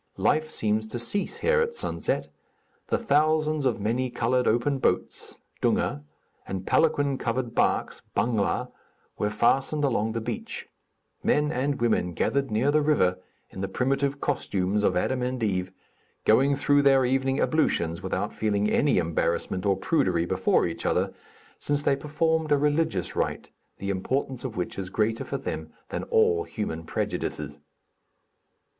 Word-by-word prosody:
Life 155 0 +2
seems 110 -3 0
to 115 - -5
cease 120 +13 -2
here 480 0 +4
at 470 0 -1
sunset; - - -2 0.6
the - - +1
thousands 155 - +2
of 120 - 0
many 120 +5 0
colored 125 +2 +1
open 125 +5 +2
boats - - -1 0.2
(dunga) 70 - +1 0.5
and 95 -1 -4
palanquin 145 -4 +2
covered 120 0 -2
barks - - +1 0.2
(bangla) 110 -4 0 0.5
were 105 - +1
fastened 135 +7 +1
along 110 -5 +1
the 115 - -1
beach; 110 - -5 0.5
men 150 0 +2
and 140 0 -1
women 110 -7 +1
gathered 140 +10 0
near 115 +6 +2
the 155 +1 +3
river, 120 -13 +2 0.3
in 95 - -7
the 95 - -1
primitive 135 +4 0
costumes 105 -8 0
of - - +2
Adam 125 +7 0
and 125 -1 -2
Eve, 95 -3 0 0.5
going 135 +6 +4
through 145 +1 +3
their 135 -2 +5
evening 135 +2 +1
ablutions 85 - +1
without - - -2
feeling 105 -1 0
any 145 - +3
embarrassment 90 +2 0
or 100 -1 +3
prudery 95 - +1
before 95 +1 +2
each 85 - -4
other, - - +1 0.5
since 145 0 -1
they 140 - +3
performed 160 +2 0
a 145 - +6
religious 145 - 0
rite, - - -2 0.3
the 100 0 -3
importance 130 +6 -2
of 120 -5 -5
which 90 +2 -3
is 95 -1 -4
greater 110 +3 0
for - - -3
them - - -5 0.2
than - - -3
all 445 -2 +3
human - - -4
prejudices. - - -3
130 Hz, 150 wpm, -26 LUFS, 105-145 Hz, 0.6 s, a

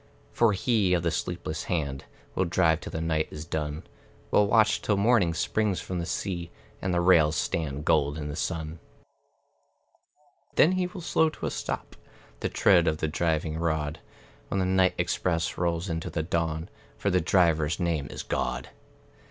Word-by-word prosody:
For 115 -3 +3
He 100 -2 +2
of 85 - -1
the 85 - +1
sleepless - - -3
hand 70 -5 -2 0.3
Will 95 - +1
drive 85 -2 +2
till - - -7
the 80 - -4
night 80 -1 0
is 75 0 -7
done 75 -1 -3 0.5
Will 105 - +4
watch 110 0 +4
till 105 - +1
morning 100 -5 +3
springs 100 +2 0
from 90 -1 -4
the 85 - -3
sea, 85 -3 -3 0.3
And 95 - -1
the 90 - +2
rails 85 -3 +5
stand 75 -3 -2
gold 75 -1 +2
in 75 -1 -4
the 75 - -5
sun; 80 -1 -3 1.8
Then 160 - +6
he 185 -1 0
will 180 0 -9
slow 160 -1 +2
to - - -7
a - - -1
stop - - -4 0.4
The - - -1
tread 85 -3 +4
of 80 -1 +1
the 80 - -1
driving 80 0 -1
rod, 80 -2 -1 0.5
When 100 - -1
the 95 - +1
night 95 0 +3
express 85 -2 0
rolls 85 +1 -1
into 80 -2 -3
the 80 - -2
dawn; 80 0 -2 0.3
For 100 - 0
the 90 0 +3
Driver's 80 -2 +2
name 85 -5 -1
is - - -6
God. 65 0 -2
85 Hz, 175 wpm, -27 LUFS, 80-95 Hz, 1.8 s, Then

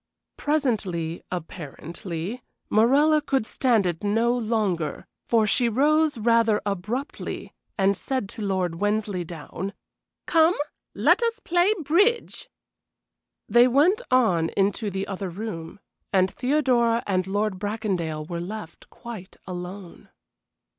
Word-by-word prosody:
Presently, 200 - -1
apparently, 170 - -6 0.3
Morella 285 +8 +4
could 270 -5 0
stand 230 -4 +2
it 175 0 -2
no 225 +4 +2
longer, 210 -10 -1 0.2
for 225 -2 +3
she 235 +3 +3
rose 300 +4 +3
rather 230 -1 +3
abruptly 210 - -4 0.2
and 195 0 +3
said 260 0 -2
to 225 - -7
Lord 185 -4 -1
Wensleydown: 195 -3 -2 0.5
"Come, 325 +1 +4 0.4
let - - +4
us 465 -1 0
play 350 +3 +3
bridge." 410 - +1 1.0
They 240 +1 +6
went 310 - +4
on 185 -11 +3
into 205 +2 +1
the 190 0 -3
other 195 0 -4
room, 175 -3 -6 0.3
and 185 -1 +3
Theodora 250 -4 +2
and 185 -2 0
Lord 205 -1 -1
Bracondale 190 -7 -2
were 170 -1 -4
left 180 -2 -8
quite 220 -6 -10
alone. 180 0 -8
210 Hz, 115 wpm, -25 LUFS, 185-250 Hz, 1.0 s, They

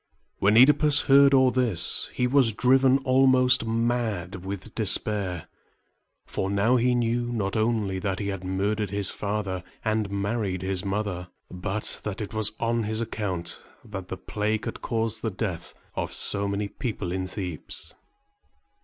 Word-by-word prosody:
When 100 +2 +4
OEdipus 145 +3 +6
heard 140 0 +6
all 130 -2 +5
this, 120 -10 +1
he 125 - 0
was 125 -3 +4
driven 130 +3 +4
almost 130 -2 +4
mad 110 -6 -1
with 100 +3 -6
despair; 100 -4 0 0.8
for 95 - -3
now 100 +5 +2
he 125 +1 +2
knew 120 0 0
not 100 -4 -2
only 110 -4 0
that 95 0 -2
he 100 -1 -3
had 95 -2 -4
murdered 100 +3 -1
his 100 0 -1
father 100 -3 -3 0.2
and 110 -2 0
married 100 -2 -2
his 95 0 -1
mother, 100 -3 -3 0.2
but 95 +4 -4
that 105 -2 -4
it 105 0 -5
was 110 -1 0
on 115 0 0
his 110 0 -1
account 100 -7 -3 0.3
that 100 -4 -7
the 95 - -5
plague 105 +2 -2
had - - -5
caused 115 -1 -1
the 115 - -1
death 95 -4 -5 0.2
of - - -3
so 100 0 -1
many 100 +1 -2
people 105 -6 -4
in 95 0 -2
Thebes. 90 -4 -6
105 Hz, 155 wpm, -26 LUFS, 95-120 Hz, 0.8 s, OEdipus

